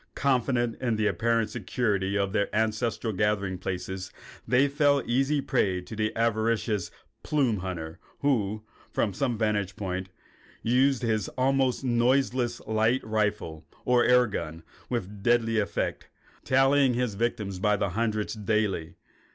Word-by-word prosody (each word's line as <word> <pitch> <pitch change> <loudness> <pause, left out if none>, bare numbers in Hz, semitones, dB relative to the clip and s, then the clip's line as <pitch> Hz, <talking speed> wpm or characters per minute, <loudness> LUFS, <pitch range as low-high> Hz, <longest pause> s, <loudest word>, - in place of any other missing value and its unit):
Confident 125 -3 +1
in 120 -3 +1
the 110 0 0
apparent 115 +1 +1
security 100 -3 -1
of 100 -1 -1
their 100 -2 +1
ancestral 110 +1 0
gathering 100 -2 0
places, 95 0 -4 0.4
they 130 +3 +4
fell 145 0 +3
an 135 - -4
easy 135 +4 +1
prey 95 -8 +1
to 110 - -9
the 110 0 0
avaricious 110 -3 0 0.3
plume 135 -8 +1
hunter 85 -4 -5 0.2
who, 110 -7 0 0.3
from 100 - 0
some 120 +3 -1
vantage 105 -4 0
point, 95 -2 -4 0.5
used 130 +2 +2
his 110 -3 0
almost 130 0 +1
noiseless 125 0 +1
light 110 +4 +1
rifle 105 -7 -1 0.2
or 125 -1 +4
air 125 0 +5
gun 80 -6 -5 0.3
with 105 -4 -4
deadly 115 0 +2
effect, 100 - -2 0.3
tallying 135 0 +4
his 125 -3 0
victims 100 -3 -2
by 105 +2 +2
the 100 - 0
hundred 110 +2 -1
daily. 100 -6 0
110 Hz, 135 wpm, -27 LUFS, 100-125 Hz, 0.5 s, air